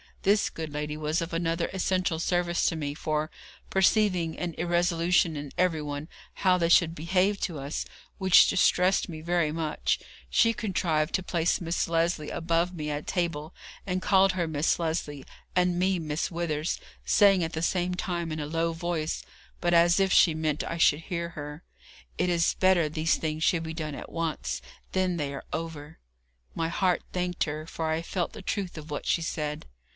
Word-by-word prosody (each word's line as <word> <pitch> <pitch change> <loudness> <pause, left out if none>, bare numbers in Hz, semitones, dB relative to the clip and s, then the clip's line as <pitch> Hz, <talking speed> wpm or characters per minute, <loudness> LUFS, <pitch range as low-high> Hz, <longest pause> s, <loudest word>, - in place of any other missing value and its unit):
This 200 +1 +3
good 160 -2 -6
lady 150 +1 -3
was 155 +1 -1
of 165 - -4
another 165 0 0
essential 185 -3 0
service 175 0 +1
to 165 - -3
me, 145 -2 -3
for, 155 0 -1 0.4
perceiving 190 -4 +2
an 175 -2 -3
irresolution 175 0 +2
in 145 -1 -6
everyone 155 -4 -1 0.3
how 185 -1 +3
they 170 -1 +2
should 170 -1 +5
behave 185 +5 +1
to 170 -5 -2
us, 140 +2 -3 0.3
which 190 -2 +7
distressed 185 +1 +3
me 160 -2 -7
very 170 -2 +1
much, 155 -1 -1 0.3
she 230 0 +4
contrived 170 -8 0
to 190 - -1
place 170 -2 +1
Miss 170 0 -1
Lesley 165 -2 0
above 170 +2 0
me 150 -2 -4
at 145 0 -4
table, 170 -4 -2 0.3
and 185 -1 -1
called 195 0 +4
her 175 -2 -1
Miss 155 0 +1
Lesley, 160 -4 -2 0.3
and 180 -1 +2
me 185 +1 +2
Miss 155 -1 -2
Withers, 165 -2 -2 0.2
saying 195 -4 +5
at 165 - -3
the 160 - -2
same 180 0 0
time 175 -2 -3
in 155 - -3
a 145 - -3
low 165 +2 0
voice, 165 -1 -2 0.4
but 175 0 +1
as 170 +2 +5
if 195 -1 +2
she 170 - +6
meant 155 -2 -1
I 170 - -4
should 155 -2 +4
hear 170 -1 -3
her, 150 0 -8 0.6
'It 180 - +2
is 170 -1 +2
better 185 -4 +3
these 155 +2 +1
things 155 0 -3
should 165 -1 +2
be 160 0 -5
done 155 -3 -4
at - - -9
once, 165 -2 -2 0.3
then 185 -2 +1
they 145 -3 -2
are 135 - -7
over.' 160 -1 -5 0.5
My 165 0 -1
heart 180 +1 +1
thanked 180 -1 -1
her, 155 +1 -5
for 160 -1 -3
I 160 +1 0
felt 175 0 -2
the 220 - -8
truth 190 -3 -3
of 155 0 -9
what 145 - -4
she 170 - +2
said. 150 - -3
165 Hz, 180 wpm, -28 LUFS, 155-180 Hz, 0.6 s, which